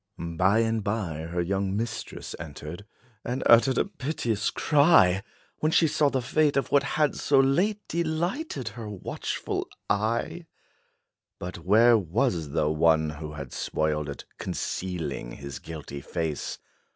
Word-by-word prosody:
By 90 +6 +2
and 115 -1 0
by 100 -7 -2
her 85 0 -1
young 95 +2 -1
mistress 110 0 -4
entered, 75 +4 -8 0.4
And 125 +2 -2
uttered 120 +3 +6
a - - +3
piteous 130 - -2
cry, 145 - +4 0.4
When 155 - +1
she 160 - +5
saw 145 0 +2
the 130 -2 -1
fate 150 +3 +2
of 140 - 0
what 140 - +5
had 150 +2 +1
so 140 -2 +3
late 180 +11 +2
Delighted 170 - -2
her 110 0 -8
watchful 100 -3 -4 0.2
eye. 115 - -1 0.9
But 90 +1 -6
where 115 +4 +5
was 85 -3 0
the 75 +1 +1
one, 80 0 +3
who 75 0 -7
had 70 -4 -7
spoiled 75 -1 -1
it, 70 - -7
Concealing 90 -9 -3
his 70 -1 -7
guilty 75 -3 -7
face? 80 0 -3
105 Hz, 140 wpm, -27 LUFS, 80-135 Hz, 0.9 s, uttered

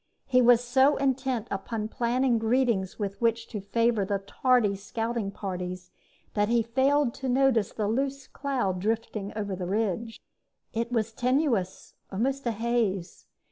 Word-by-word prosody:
He 255 -1 +4
was 245 0 +6
so 265 +4 +4
intent 265 -4 0
upon 210 +2 -3
planning 240 +1 +1
greetings 225 -4 +1
with 200 -1 -4
which 230 0 +1
to 210 -4 -5
favor 230 +2 +1
the 200 +1 0
tardy 210 +1 +2
scouting 225 +2 -3
parties 180 -2 -5 0.4
that 205 0 +1
he 235 -1 +3
failed 265 +2 +2
to 265 -1 -4
notice 250 -5 +3
the 210 -2 -2
loose 270 +4 -1
cloud 245 -10 -2
drifting 215 0 -2
over 205 -3 -3
the 180 -1 -4
ridge. 220 +3 -1 0.5
It 230 +1 -2
was 225 -2 0
tenuous, 245 - 0 0.2
almost 260 +6 -1
a - - +2
haze. 220 -5 -1
230 Hz, 145 wpm, -27 LUFS, 200-255 Hz, 0.5 s, was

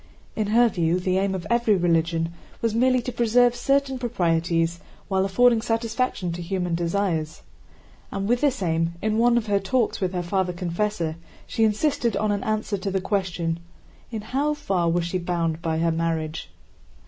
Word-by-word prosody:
In 215 -2 -1
her 235 +3 +5
view 175 -4 +1
the 185 +1 +1
aim 195 0 0
of 180 - -5
every 235 -3 +3
religion 165 -1 +1 0.3
was 230 -2 0
merely 255 +1 +3
to 250 - -3
preserve 240 +1 +3
certain 275 +1 +1
proprieties 170 -7 0 0.3
while 190 -1 +2
affording 230 +4 +4
satisfaction 230 -4 -1
to 175 +1 -5
human 180 0 -2
desires. 170 -2 -1 0.7
And 195 0 -2
with 245 +2 +2
this 270 -8 +1
aim, 165 0 0
in 215 0 +1
one 240 0 +4
of 235 - 0
her 205 -2 +2
talks 215 +4 0
with 185 -1 0
her 180 -1 -1
Father 185 0 0
Confessor, 175 -2 -2 0.3
she 225 - 0
insisted 225 +1 +1
on 215 -1 +1
an 205 - -1
answer 215 -2 -1
to 195 - -3
the 190 0 0
question, 180 -4 -1 0.5
in 220 -3 -4
how 275 +7 -1
far 180 -11 0
was 170 0 +1
she 180 +2 -2
bound 170 -2 -1
by 165 -2 -1
her 165 +1 +2
marriage? 160 -1 -2
195 Hz, 175 wpm, -24 LUFS, 170-230 Hz, 0.7 s, her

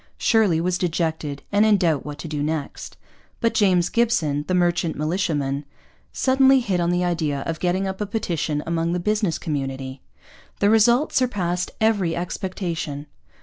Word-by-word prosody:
Shirley 210 -8 +3
was 180 +1 0
dejected 160 -4 -2
and 205 +1 +4
in 215 -1 +5
doubt 165 -7 +1
what 145 -1 -7
to 155 - -7
do 150 -2 -3
next. 155 -1 -4 0.4
But 230 - +1
James 180 -4 +3
Gibson, 165 -12 +1
the 185 - +1
merchant 175 -2 +1
militiaman, 150 -4 -1 0.5
suddenly 265 0 +4
hit 200 -8 -1
on 170 0 +1
the 175 0 +1
idea 155 -5 -1
of 160 +2 -4
getting 185 +2 0
up 190 +1 -4
a 210 - -1
petition 165 -8 -2
among 165 0 -1
the 180 - -1
business 210 -2 0
community. 135 -3 -4 0.6
The 205 +1 +3
result 235 +6 +4
surpassed 185 -8 0
every 205 -7 +2
expectation. 170 -5 -4
175 Hz, 155 wpm, -23 LUFS, 155-205 Hz, 0.6 s, in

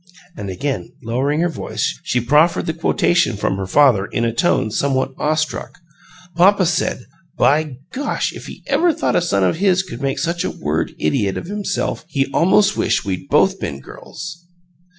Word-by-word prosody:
And 100 - -6
again 135 +9 -3
lowering 135 +7 0
her 175 - +2
voice, 165 - -3
she 125 - 0
proffered 150 +8 +3
the 160 - -1
quotation 165 - +1
from 95 -1 -1
her 95 -1 -4
father 115 -5 +4
in 115 - -1
atone 115 -1 +1
somewhat 135 +2 0
awe 155 +1 +1
struck: 155 +3 -3 0.6
"Papa 190 +2 +5
said, 160 -6 -1 0.3
by 150 -2 +2
Gosh! 280 +2 -2
if - - -10
he - - -11
ever 350 - +2
'a' 330 - +3
thought 320 - 0
a - - +3
son 100 - +1
of 95 - +1
his 190 0 +2
could 150 -9 -9
make 135 -1 -1
such 170 +4 -1
a - - -1
Word - - -2
idiot 95 +5 0
of - - -5
himself 205 +2 -3
he 140 -4 0
almost 200 +4 +4
wished - - 0
we'd 95 +8 -4
both 190 +6 +3
been 70 0 -4
girls!" 170 - -10
150 Hz, 180 wpm, -19 LUFS, 120-175 Hz, 0.6 s, Papa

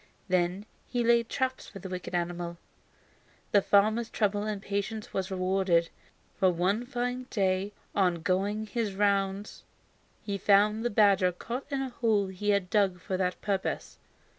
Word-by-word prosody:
Then 180 +2 +1 0.2
he 245 -1 -1
laid 235 0 +3
traps 260 -1 -2
for - - -10
the 195 - -7
wicked 180 -1 -5
animal. 175 0 -2 0.9
The 205 - +5
farmer's 215 +4 +3
trouble 205 -1 0
and 215 -2 -2
patience 205 +2 -4
was 190 0 -2
rewarded, 185 -2 +1 0.5
for 190 -2 +5
one 190 +7 0
fine 250 0 -3
day 195 -1 0 0.2
on 180 -4 +1
going 200 +5 0
his 215 -2 -2
rounds 200 0 0 0.6
he 200 -2 -3
found 210 +3 +4
the 240 - +1
badger 200 -4 +4
caught 240 +10 -6
in 275 -2 -1
a 265 - -3
hole 220 -5 +1
he 190 +2 -3
had 200 -3 +1
dug 195 -4 +2
for 185 +1 -3
that 180 -1 -1
purpose. 195 -2 -2
200 Hz, 155 wpm, -29 LUFS, 185-215 Hz, 0.9 s, The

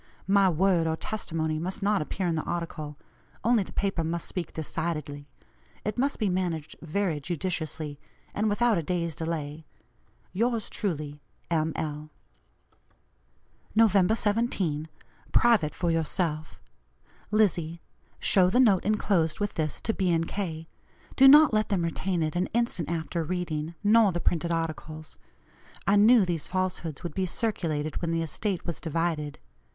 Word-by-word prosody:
My 195 0 +4
word 175 0 +2
or 160 - +1
testimony 160 -5 -2
must 185 +4 -4
not 205 -2 +2
appear 185 +5 -3
in 170 - +1
the 160 - 0
article; 155 -4 -4 0.5
only 235 -1 +4
the 190 - -6
paper 195 -4 -1
must 165 +1 -3
speak 180 -3 -4
decidedly. 150 -2 -4 0.6
It 210 +2 -2
must 275 +2 +1
be 215 - 0
managed 175 -5 -2
very 165 -1 -1
judiciously, 160 -2 -3 0.3
and 215 +1 +1
without 220 -1 +2
a - - -1
day's 170 0 -2
delay. 160 -2 -4 0.7
"Yours 230 +2 0
truly, 150 -6 -3 0.3
"M. 160 -1 +1
L." 150 -1 -4 1.7
"Nov 225 -1 +6 0.3
17 195 -9 0 0.4
(Private 215 -11 +4
for 175 -1 0
yourself). 160 -1 -2 0.7
"LIZZIE: 175 -6 +1 0.4
Show 185 -2 +4
the 245 - +2
note 210 -8 +5
enclosed 195 -5 +1
with 205 -1 -1
this 155 -3 -2
to 225 - -1
B. 180 -5 +2
& - - -9
K.; 165 -5 -4 0.5
do 270 - +7
not 295 -1 +8
let 215 0 +2
them 190 -4 +1
retain 170 +1 -1
it 155 0 -2
an 180 +1 +1
instant 235 -9 0
after 165 0 -2
reading, 165 -2 -3
nor 215 -1 +5
the 175 - -2
printed 170 -1 0
articles. 155 -1 -4 0.7
I 200 - +4
knew 215 +1 +6
these 170 -4 -2
falsehoods 185 -5 -2
would 170 -3 -4
be 190 +1 -1
circulated 160 -7 -1
when 170 - -1
the 165 0 0
estate 185 +4 -2
was 170 - -4
divided. 160 -2 -2
170 Hz, 145 wpm, -27 LUFS, 160-200 Hz, 1.7 s, not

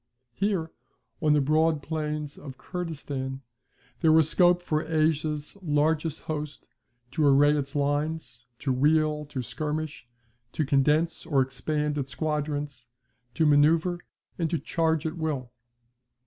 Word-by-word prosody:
Here, 185 - -1 0.5
on 155 -2 +4
the 150 - +4
broad 155 +1 +2
plains 150 -2 -3
of 135 -3 -10
Kurdistan, 140 -6 -5 0.6
there 160 - +4
was 160 -1 +5
scope 175 +1 +4
for 155 -2 0
Asia's 155 -1 0
largest 155 -1 +1
host 150 -2 -5 0.5
to 155 - 0
array 145 +1 +5
its 140 -1 -3
lines, 145 -3 -2
to 135 0 -1
wheel, 150 +2 +2
to 135 -3 -5
skirmish, 150 +1 -4 0.5
to 155 - 0
condense 150 +4 +2
or 145 -5 +2
expand 150 +3 -2
its 135 0 -4
squadrons, 145 -4 -3 0.5
to 160 - +2
manoeuvre, 160 +4 +4 0.4
and 165 -2 0
to 165 - 0
charge 160 -1 0
at 160 +2 -3
will. 145 -7 -3
150 Hz, 130 wpm, -27 LUFS, 145-160 Hz, 0.6 s, was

